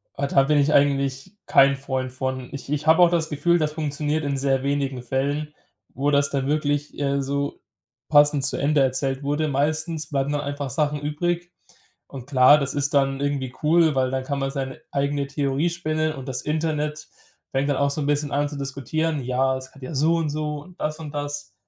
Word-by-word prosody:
Ah, 140 0 -1
da 135 -1 +4
bin 150 +2 +2
ich 145 +1 +3
eigentlich 140 +3 +1
kein 140 0 +5
Freund 130 -2 -3
von. 130 0 -4
Ich 135 -1 -8
ich 150 +1 -2
habe 160 +2 +6
auch 175 - +7
das 165 -2 0
Gefühl, 160 +4 +2
das 150 -1 0
funktioniert 150 0 -2
in 140 -1 -1
sehr 135 -1 +1
wenigen 140 -2 -1
Fällen, 140 +4 -2 0.4
wo 140 +2 0
das 140 0 +3
dann 135 -1 -1
wirklich, 145 -1 -1
äh, 140 -1 0
so 140 +1 -2 0.5
passend 145 -1 +5
zu 140 - +1
Ende 145 +1 +2
erzählt 135 +1 0
wurde. 145 +2 0
Meistens 155 +3 -1
bleiben 140 -1 -1
dann 145 0 -1
einfach 145 -1 -4
Sachen 150 +2 -1
übrig. 175 +4 -2 0.6
Und 130 -3 -9
klar, 135 +1 +6
das 140 -2 -2
ist 145 0 -1
dann 135 -1 +2
irgendwie 140 -3 -2
cool, 160 0 +4
weil 130 -1 +2
dann 130 0 -1
kann 140 +1 -3
man 135 0 -1
seine 135 -1 -5
eigene 140 0 -1
Theorie 140 +3 0
spinnen 155 -2 -1
und 135 -2 -9
das 130 -1 -3
Internet 150 0 -2 0.4
fängt 135 +2 0
dann 145 - +2
auch 140 0 +2
so 150 - -3
'n - - -1
bisschen 145 0 0
an 145 +1 +1
zu 145 - -7
diskutieren: 140 +3 -2
Ja, 130 +1 +1
es 130 0 -11
hat 140 - -15
ja 130 - -6
so 155 +4 +2
und 165 -2 0
so 150 0 -3
und 180 +2 -18
das 155 +1 -2
und 155 -2 -8
das. 145 0 -5
145 Hz, 210 wpm, -23 LUFS, 135-150 Hz, 0.6 s, auch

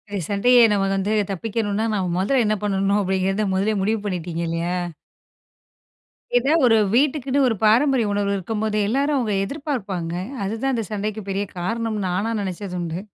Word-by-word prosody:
எ - - 0
சண்டைய 245 +5 +4
நம்ம 200 -1 +2
வந்து 195 +2 0 0.2
தப்பிக்கணுன்னா 210 +2 -2
நாம 190 -3 0
முதல்ல 235 +7 +2
என்ன 215 0 +2
பண்ணனும் 200 0 +1
அப்பிடிங்கறத 190 +1 0
முதலே 195 +3 +1
முடிவு 215 +3 +1
பண்ணிட்டீங்க 175 -4 -3
இல்லயா! 165 +2 -2 1.6
எதா 265 +5 +3
ஒரு 225 -2 +5 0.2
வீட்டுக்குன்னு 275 0 +2
ஒரு 230 - +1
பாரம்பரிய 240 +3 +4
உணவுகள் 200 0 0
இருக்கும்போதே, 215 +2 -2
எல்லாரும் 280 +6 +1
அவுங்க 230 -5 0
எதிர்பார்ப்பாங்க, 205 - -4 0.3
அதுதான் 225 +7 -1
இந்த 230 - -1
சண்டைக்குப் 210 0 -4
பெரிய 195 +1 -1
காரணம்னு 215 +2 -2
நானா 195 +6 -1
நினைச்சதுண்டு. 180 -3 -4
210 Hz, 140 wpm, -22 LUFS, 190-230 Hz, 1.6 s, ஒரு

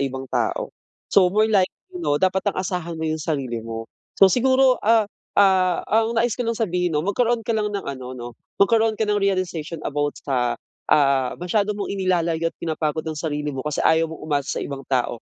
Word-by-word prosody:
ibang 135 -1 -4
tao. - - -1 0.4
So, 185 -2 +6
more 215 +2 +3
likely, 220 - -1
'no? 145 - +1
Dapat 190 0 +1
ang - - -12
asahan 180 -3 -3
mo 160 - -3
yung 155 -1 -2
sarili 130 -8 -2
mo. 115 0 -6 0.3
So, 195 - +9
siguro, 260 +4 +3
ah, 220 -1 +4 0.3
ah, 185 -3 +4
ang 225 +1 +1
nais 235 -1 +2
ko 245 - -2
lang 230 -1 -2
sabihin, 180 -5 0
'no? 150 - 0
Magkaroon 235 +2 +1
ka 230 - 0
lang 210 -1 0
ng 200 -1 -4
ano, 130 -2 -5
'no? 120 0 -6 0.3
Magkaroon 220 +2 +3
ka 220 - +2
ng 210 0 +1
realization 175 -5 -1
about 145 0 -2
sa, 125 -3 -1 0.3
ah, 135 -3 +3
masyado 200 +4 0
mong 205 - -3
inilalayo't 170 -3 0
pinapagod 160 -1 -2
ang 160 - -3
sarili 150 -2 -3
mo, 130 - -4
kasi 150 -1 -3
ayaw 160 0 +3
mong 160 - -9
umasa 145 -3 -1
sa - - -3
ibang 140 -1 -6
tao. 120 -2 0
175 Hz, 195 wpm, -22 LUFS, 145-210 Hz, 0.4 s, So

